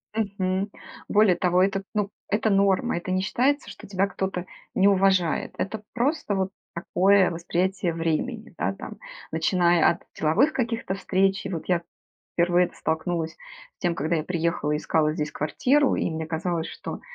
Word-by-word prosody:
Мгм. 200 -2 -1 0.4
Более 205 -3 +4
того, 180 +1 +2
этот 195 +1 +1
ну, 205 -2 0 0.2
это 215 +1 +1
норма, 195 +2 +2
это 175 +2 -4
не 185 0 +1
считается, 270 +8 +1
что - - -11
тебя 195 0 +1
кто-то 190 -2 -3 0.3
не 195 +1 +5
уважает, 190 -4 +2
это 210 +2 -3
просто 250 -3 0
вот 190 -1 0 0.2
такое 190 +2 +3
восприятие 175 +1 -1
времени, 170 +9 -2
да - - 0
там, - - -8 0.4
начиная 175 -3 +3
от 170 - -2 0.2
деловых 210 - +3
каких-то 230 -6 -1
встреч. 195 0 +1
И - - -3
вот 170 -4 -4
я 175 -2 +2 0.5
впервые 175 +1 +3
это - - -18
столкнулась 160 0 -2
с - - -31 0.4
тем, 175 -2 0
когда 160 +3 0
я 155 - 0
приехала 170 -3 -1
и 150 - +1
искала 155 0 +1
здесь 155 -1 -3
квартиру, 265 - +2
и - - 0
мне 160 0 -3
казалось, 165 +1 -2
что - - -7
185 Hz, 165 wpm, -25 LUFS, 170-200 Hz, 0.5 s, не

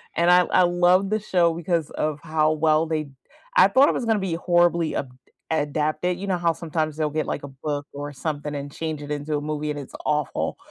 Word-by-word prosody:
And 170 +1 +4
I 180 0 +7
I - - +5
love 175 +2 +3
the 215 +1 +1
show 175 -5 +2
because 170 -2 -1
of 150 -1 -2
how 155 -1 +2
well 155 +1 +2
they 155 -2 -2 0.5
I - - +7
thought 270 +2 +5
it - - +1
was 245 - -2
gonna 225 -2 +2
be 190 -3 -2
horribly 175 -1 +2
abd 130 - -3 0.4
adapted, 155 +3 0
you 200 - -5
know 185 -2 +1
how 170 -1 +2
sometimes 155 -2 -3
they'll 155 -1 0
get 155 +1 -2
like - - -3
a - - -5
book 145 +1 -5
or 145 +1 -6
something 150 +1 -4
and 140 0 -5
change 155 0 -4
it 145 0 -7
into 150 +1 -2
a - - -4
movie 150 0 -3
and 145 - -5
it's 140 - -10
awful, 150 -2 -1
155 Hz, 225 wpm, -24 LUFS, 150-175 Hz, 0.5 s, I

